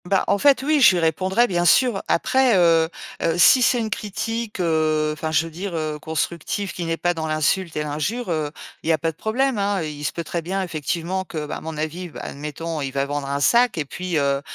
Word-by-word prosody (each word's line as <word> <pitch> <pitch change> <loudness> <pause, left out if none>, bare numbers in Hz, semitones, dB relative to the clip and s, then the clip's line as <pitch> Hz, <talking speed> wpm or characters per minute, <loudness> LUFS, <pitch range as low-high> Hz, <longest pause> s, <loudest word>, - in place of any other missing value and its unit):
Bah, 190 +1 +2
en 200 - +2
fait, 275 0 +4
oui, 300 0 +2
je 235 - +8
lui - - +1
répondrai, 185 +8 +2
bien 175 -6 0
sûr. 215 +4 +4
Après, 255 +3 +3
heu 165 -2 +4 0.3
heu, 165 0 +1
si 215 +9 +7
c'est 245 0 +3
une 220 -1 -3
critique, 220 +1 -4
heu 155 -2 +1
enfin, 155 +1 -4
je 160 +1 +2
veux 165 - -8
dire, 180 +2 -5
heu, 155 -2 -3
constructive, 170 +4 -3
qui 175 - -4
n'est 165 0 -1
pas 175 +1 +1
dans 160 -2 -4
l'insulte 155 +3 0
et 150 - 0
l'injure, 165 +11 -3
heu, 155 -2 -1 0.3
il - - -4
y - - +5
a - - +2
pas 165 +2 -1
de - - -25
problème, 250 +2 0
hein. 200 -3 0
I 150 -2 -6
il - - -7
se - - 0
peut 170 - -5
très 170 +2 -3
bien, 190 +4 -2
effectivement, 170 +3 -3
que, 155 -4 -5
bah, 150 - -5
à - - -10
mon 160 -1 -6
avis, 165 +4 -4
bah - - -9
admettons, 150 +2 -5
il 135 - -2
va 135 +1 -1
vendre 145 0 -3
un 140 0 -1
sac. 235 +6 +3
Et 155 - -1
puis, 180 +3 -3
heu, 140 -1 +1
170 Hz, 250 wpm, -22 LUFS, 155-200 Hz, 0.3 s, je